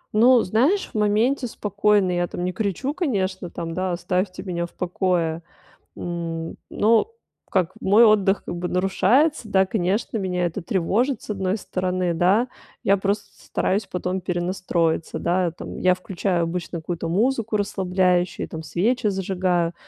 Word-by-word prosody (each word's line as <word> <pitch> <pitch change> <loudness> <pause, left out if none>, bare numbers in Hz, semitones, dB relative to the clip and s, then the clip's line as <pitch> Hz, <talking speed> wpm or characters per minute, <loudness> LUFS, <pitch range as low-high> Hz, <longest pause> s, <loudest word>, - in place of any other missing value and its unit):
Ну, 240 +2 +6
знаешь, 265 - +1
в - - -19
моменте 220 +6 +2
спокойно, 205 -3 +1
я, 175 0 0
там, 175 - -5
не 180 - 0
кричу, 220 - -2
конечно, 190 - -1
там, 165 -1 -5
да, 185 0 -1
оставьте 185 +2 -2
меня 170 -2 -3
в - - -24
покое. 175 -2 -1 0.6
Н 165 -1 -4
ну, 225 - +3 0.4
как 185 -3 +1
мой 210 +5 +6
отдых, 205 -2 +4
как 175 - -5
бы, 175 - -3
нарушается, 230 - +2
да, 190 -1 +4
конечно, 205 +3 -1
меня 180 -2 -1
это 175 +2 -4
тревожит, 210 +10 0
с - - -9
одной 190 0 -1
стороны, 185 -3 -1
да, 195 +9 +3 0.3
я 200 - +4
просто 200 +1 -1
стараюсь 195 +1 -1
потом 180 +1 -3
перенастроиться, 175 -2 -1
да, 175 0 +1
там, - - -8
я 185 0 +4
включаю 180 -1 -1
обычно 170 +1 -3
какую-то 165 0 -4
музыку 225 +4 +1
расслабляющую, 185 -3 0
там, 160 0 -7
свечи 220 +9 0
зажигаю, 185 -3 0
185 Hz, 150 wpm, -23 LUFS, 175-210 Hz, 0.6 s, Ну